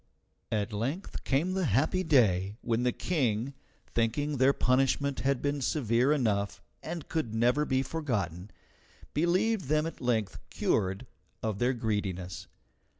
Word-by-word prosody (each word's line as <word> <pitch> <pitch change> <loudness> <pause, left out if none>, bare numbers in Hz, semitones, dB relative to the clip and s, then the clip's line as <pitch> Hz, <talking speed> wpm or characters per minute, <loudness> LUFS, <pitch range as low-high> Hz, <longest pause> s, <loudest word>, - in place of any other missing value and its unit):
At 105 0 -1
length 135 - -3
came 145 +7 +1
the 190 -1 0
happy 145 - +2
day 105 - +3
when 115 0 0
the 125 0 +2
King, 130 -5 -1 0.4
thinking 140 +6 0
their 130 +2 +5
punishment 135 +1 +1
had 135 -2 0
been 145 0 0
severe 125 -1 +2
enough 105 -8 +1 0.2
and 170 -3 -6
could 155 -9 -2
never 125 +6 +3
be 130 -1 +1
forgotten, 105 - -3 0.6
believed 185 +5 +2
them 155 +3 +2
at 165 - -6
length 110 -5 0
cured 95 +1 0 0.4
of 110 -3 -2
their 125 +2 +2
greediness. 100 -7 -3
125 Hz, 135 wpm, -30 LUFS, 110-150 Hz, 0.6 s, their